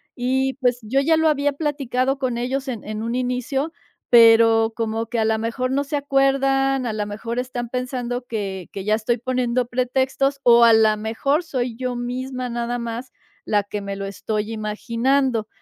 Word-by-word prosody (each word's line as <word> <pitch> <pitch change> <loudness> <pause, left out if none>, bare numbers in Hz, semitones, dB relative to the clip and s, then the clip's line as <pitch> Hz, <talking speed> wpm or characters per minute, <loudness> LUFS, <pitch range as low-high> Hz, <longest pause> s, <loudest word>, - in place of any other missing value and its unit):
Y, 260 +1 0
pues, 245 -2 0
yo 235 +6 0
ya 320 +4 +3
lo 320 0 +3
había 290 -1 +1
platicado 275 -3 -1
con 255 -3 -2
ellos, 265 +3 -2
en 240 -5 -4
en 215 +1 -5
un 230 +1 -2
inicio, 255 +4 -1 0.4
pero 225 -1 +6
como 225 0 -2
que, 235 +1 -2
a 220 - +2
la 220 0 +2
mejor, 230 +3 -2
no 280 +2 +1
se 285 +1 -4
acuerdan, 270 -1 +2
a 220 - -2
la 210 -1 -2
mejor, 225 +3 -5
están 250 -1 -3
pensando 250 0 -3
que 195 -6 -4
que 195 - -5
ya 215 +2 +2
estoy 225 +2 -1
poniendo 250 0 0
pretextos 260 +2 0
o, 235 -1 +7
a 230 -1 +7
la 220 -1 +4
mejor, 250 +9 0
soy 250 -6 -3
yo 250 +1 -3
misma, 250 +1 -4
nada 240 0 -2
más, 235 +2 -5 0.3
la 205 -1 +1
que 205 +1 -5
me 200 0 -5
lo 195 0 -5
estoy 210 +2 -3
imaginando. 230 +3 0
245 Hz, 185 wpm, -22 LUFS, 225-265 Hz, 0.4 s, o